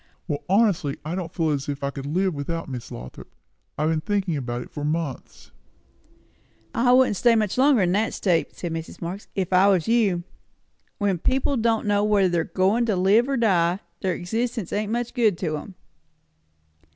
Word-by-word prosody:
"Well, 145 Hz, -4 st, -2 dB
honestly, 190 Hz, -8 st, +2 dB
I 155 Hz, -, -3 dB
don't 175 Hz, -3 st, -4 dB
feel 165 Hz, -4 st, 0 dB
as 140 Hz, -1 st, -2 dB
if 140 Hz, -1 st, -4 dB
I 140 Hz, -, -1 dB
could 140 Hz, 0 st, -7 dB
live 185 Hz, +4 st, 0 dB
without 165 Hz, +3 st, -4 dB
Miss 125 Hz, -4 st, -7 dB
Lothrop. 60 Hz, +1 st, -10 dB, 0.5 s
I've 155 Hz, +2 st, +1 dB
been 160 Hz, -1 st, 0 dB
thinking 195 Hz, -3 st, -1 dB
about 120 Hz, -3 st, -3 dB
it -, -, -16 dB
for 145 Hz, -, -6 dB
months." 150 Hz, -3 st, -4 dB, 1.2 s
"I 245 Hz, +1 st, +3 dB
wouldn't 250 Hz, -5 st, +4 dB
stay 235 Hz, +2 st, +4 dB
much 215 Hz, -3 st, 0 dB
longer 265 Hz, -4 st, +4 dB
in 175 Hz, -, +1 dB
that 210 Hz, +4 st, 0 dB
state," 175 Hz, -5 st, 0 dB
said 170 Hz, -2 st, -4 dB
Mrs. 165 Hz, 0 st, -6 dB
Marx, 180 Hz, +4 st, -6 dB
"if 185 Hz, -1 st, -2 dB
I 185 Hz, +2 st, +6 dB
was 185 Hz, -5 st, +2 dB
you. 210 Hz, -7 st, +2 dB, 0.7 s
When 200 Hz, -4 st, 0 dB
people 265 Hz, -, +1 dB
don' 225 Hz, -2 st, +1 dB
know 205 Hz, 0 st, +2 dB
whether 205 Hz, -3 st, +3 dB
they're 170 Hz, -2 st, +1 dB
goin' 205 Hz, +6 st, +1 dB
to 210 Hz, -, +1 dB
live 200 Hz, +8 st, +3 dB
or 275 Hz, -, +1 dB
die, 185 Hz, -5 st, +2 dB, 0.2 s
their 185 Hz, -3 st, -1 dB
existence 225 Hz, +2 st, -3 dB
ain't 210 Hz, +1 st, -1 dB
much 240 Hz, 0 st, -2 dB
good 220 Hz, -8 st, +2 dB
to 165 Hz, -4 st, -2 dB
'em." 185 Hz, +5 st, -10 dB
185 Hz, 190 wpm, -24 LUFS, 165-220 Hz, 1.2 s, I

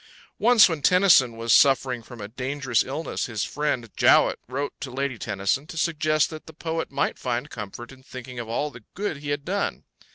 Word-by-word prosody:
Once 235 Hz, -1 st, +7 dB
when 165 Hz, -4 st, -3 dB
Tennyson 175 Hz, -10 st, +5 dB
was 115 Hz, 0 st, +1 dB
suffering 130 Hz, -3 st, +4 dB
from 120 Hz, +1 st, -12 dB
a 100 Hz, -, -5 dB
dangerous 130 Hz, 0 st, -1 dB
illness, 150 Hz, +5 st, -4 dB
his 110 Hz, -4 st, -3 dB
friend 130 Hz, -6 st, -2 dB
Jowett -, -, +4 dB
wrote 140 Hz, +3 st, -3 dB
to 140 Hz, -, -6 dB
Lady 130 Hz, -1 st, -3 dB
Tennyson 105 Hz, +7 st, -1 dB
to 165 Hz, -, -9 dB
suggest 155 Hz, -1 st, +1 dB
that 155 Hz, -1 st, -9 dB
the 160 Hz, -, -11 dB
poet 160 Hz, +1 st, -4 dB
might 140 Hz, -, -1 dB
find 125 Hz, +3 st, -3 dB
comfort 115 Hz, +3 st, -8 dB
in 130 Hz, 0 st, -15 dB
thinking 125 Hz, -1 st, -9 dB
of 115 Hz, -2 st, -6 dB
all 145 Hz, +6 st, -1 dB
the 115 Hz, -4 st, -13 dB
good 200 Hz, -6 st, -3 dB
he 145 Hz, 0 st, -7 dB
had 145 Hz, -1 st, -2 dB
done. 200 Hz, +3 st, -2 dB
135 Hz, 195 wpm, -25 LUFS, 120-155 Hz, -, Once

